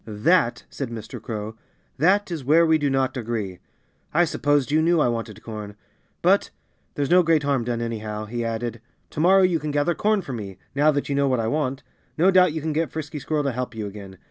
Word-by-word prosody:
"That 120 - +2
" - - -42
said 135 -4 -4
Mr. 115 0 -7
Crow 110 -1 -5 0.4
"that 195 +4 +3
is 160 -5 -4
where 160 +6 +5
we 160 -1 +3
do 145 -1 +1
not 135 0 0
agree. 110 -7 -4 0.6
I 175 +2 +5
supposed 145 -3 +1
you 155 +1 +3
knew 170 +1 +3
I 150 - +3
wanted 115 -2 -4
corn. 105 -2 -7 0.5
But - - +3 0.5
there's 145 +1 -1
no 180 +1 +7
great 165 -3 +2
harm 140 -3 +1
done, 120 -1 -2
anyhow," 110 -2 -4
he 120 +2 -4
added. 115 0 -3 0.3
"Tomorrow 185 +5 +4
you 180 -3 +2
can 150 +1 -4
gather 145 +3 +1
corn 210 +3 +1
for 135 - -6
me 100 -5 -6 0.2
now 145 +2 +3
that 145 -2 0
you 140 - -1
know 140 0 +2
what 130 -2 +1
I 115 - 0
want. 135 +1 -1 0.3
No 180 +4 +5
doubt 185 -2 +5
you 160 - -3
can 155 +1 -2
get 160 +2 0
Frisky 150 -1 -5
Squirrel 150 +2 -1
to 140 - 0
help 125 -1 -4
you 110 -1 -4
again. 100 -2 -9
140 Hz, 220 wpm, -24 LUFS, 115-160 Hz, 0.6 s, no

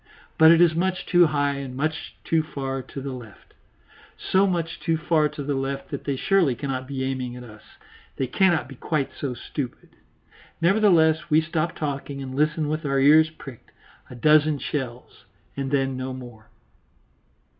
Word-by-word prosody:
But 160 0 +8
it 165 +1 +6
is 170 -2 +5
much 185 +2 -1
too 175 -1 +5
high 145 -2 0
and 135 -2 -6
much 155 +3 -3
too 165 -1 +2
far 135 -3 -4
to 135 - -9
the 135 0 -5
left 115 -5 -12 0.6
so 195 +1 +2
much 170 -3 -2
too 165 -2 0
far 160 -2 +2
to 145 0 -7
the 145 +1 -2
left 135 0 -4
that 140 - -5
they 140 - -1
surely 165 -2 +2
cannot 130 0 -4
be 135 -1 -4
aiming 130 -2 -3
at 125 - -9
us; 110 -3 -13 0.5
they 135 - -1
cannot 165 0 +2
be 135 - -10
quite 140 +2 -2
so 135 -4 -4
stupid. 125 +1 -6 0.7
Nevertheless 170 -4 +3
we 155 0 +5
stop 160 0 -2
talking 140 -1 -4
and 130 -1 -6
listen 155 +2 +1
with 155 +2 -2
our 140 -2 0
ears 155 +3 +6
pricked 140 -6 -12 0.4
a - - -9
dozen 150 +3 +4
shells, 125 -4 -6 0.3
and 135 -1 -3
then 135 -1 0
no 130 0 -4
more. 120 -4 -12
145 Hz, 175 wpm, -24 LUFS, 130-160 Hz, 0.7 s, But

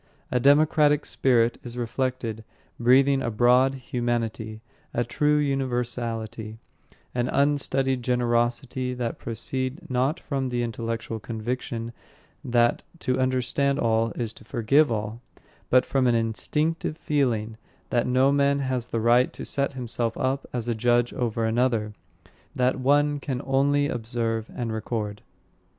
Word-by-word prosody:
A 125 - +2
democratic 150 +2 +4
spirit 120 -3 +2
is 120 0 -8
reflected, 120 -2 -2 0.4
breathing 135 +3 +4
a 120 - -1
broad 125 +4 +4
humanity, 120 -3 -3 0.3
a 120 - +2
true 150 +5 +1
universality, 120 -5 -2 0.6
an 120 0 0
unstudied 135 -2 +1
generosity 125 +1 0
that 120 -2 -3
proceed 130 +3 -3
not 130 +7 +1
from 135 -5 -2
the 120 -1 -1
intellectual 115 -1 -4
conviction 115 +2 -4 0.5
that 120 -1 +2 0.2
to 130 -4 -1
understand 130 +2 +1
all 115 -3 +1
is 115 -3 -3
to - - -15
forgive 120 +6 +2
all, 110 +1 -3 0.5
but 130 0 +5
from 135 -2 +1
an 120 - +3
instinctive 150 +8 -1
feeling 115 -9 0 0.3
that 120 -1 +1
no 130 +2 +4
man 140 0 +3
has 130 -3 -2
the 115 - -2
right 120 +3 +4
to - - -7
set 140 0 0
himself 120 -2 -3
up 135 0 -1
as 120 -2 -3
a 120 - +1
judge 120 +1 +2
over 115 -2 -1
another, 115 -2 +1 0.6
that 130 0 +1
one 145 +2 +3
can 135 -3 -3
only 140 +2 +2
observe 115 -2 -2
and 120 -3 -3
record. 105 -2 -3
125 Hz, 135 wpm, -25 LUFS, 115-135 Hz, 0.6 s, but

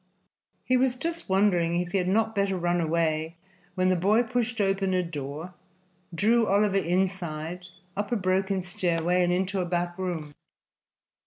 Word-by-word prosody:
He 255 - +2
was 255 0 +2
just 335 +3 -4
wondering 180 -3 +2
if 175 0 -3
he 195 - +1
had 180 - -1
not 220 +3 +2
better 200 -2 0
run 175 0 +1
away 160 0 0 0.4
when 185 0 +2
the 185 - +3
boy 205 +7 +3
pushed 245 0 -2
open 195 -1 +1
a 180 - +2
door, 155 +1 -6 0.6
drew 220 +6 +2
Oliver 200 0 +3
inside, 180 -2 -2 0.3
up 205 +2 -3
a - - +2
broken 190 -1 0
stairway 175 0 +1
and 175 - +2
into 190 +2 0
a - - -1
back 175 0 -2
room. 165 -5 -4
185 Hz, 160 wpm, -27 LUFS, 175-200 Hz, 0.6 s, the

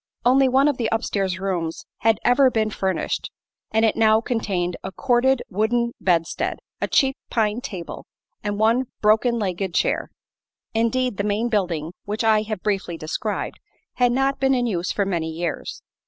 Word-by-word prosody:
Only 260 +2 +5
one 270 +3 +4
of 290 -4 +1
the 230 -3 0
upstairs 195 -5 -1
rooms 175 -4 -3
had 225 0 +3
ever 260 +2 +5
been 220 -3 0
furnished, 190 -2 -2 0.4
and 220 +1 +2
it 220 - +2
now 220 -1 +5
contained 195 -7 -1
a 190 - -5
corded 255 +3 +2
wooden 235 +4 0
bedstead, 170 -3 0 0.2
a - - +1
cheap 270 -1 +3
pine 220 0 0
table 180 -8 -7 0.4
and 205 -1 -2
one 230 +4 +3 0.2
broken 220 +3 +4
legged 190 -3 -2
chair. - - +1 0.6
Indeed, 230 0 +1
the 200 - 0
main 210 +3 0
building, 175 -7 -1
which 210 +2 -2
I 220 -1 +4
have 215 -3 -5
briefly 195 -5 -1
described, 165 +7 -3 0.4
had 245 -1 +4
not 270 +2 +1
been 270 0 +3
in 245 -1 +1
use 180 -6 -1
for 200 - 0
many 170 -4 -1
years. 165 0 -4
215 Hz, 165 wpm, -23 LUFS, 190-240 Hz, 0.6 s, Only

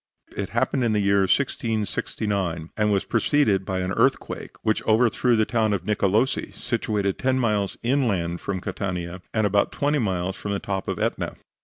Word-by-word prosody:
It 100 - -3
happened 130 +2 0
in 115 -2 +2
the 105 - +2
year 100 0 +3
1669, 100 - -1
and 105 -1 +2
was 100 -2 +1
preceded 115 -5 +2
by 95 -1 -2
an 90 0 -2
earthquake, - - 0
which 110 0 +1
overthrew 120 +2 +3
the 110 -1 +3
town 110 -3 +1
of 90 -3 -2
Nicolosi, 105 +4 +1
situated 105 -5 -1
ten 130 0 +1
miles 105 -5 0
inland 105 -10 0
from 95 -2 -3
Catania, 90 -2 -4
and 110 -1 +1
about 100 0 +2
twenty 145 +1 +1
miles 95 -4 -1
from 105 - -4
the 100 - -1
top 95 -1 -3
of - - -2
Etna. - - -2
105 Hz, 170 wpm, -24 LUFS, 95-115 Hz, -, year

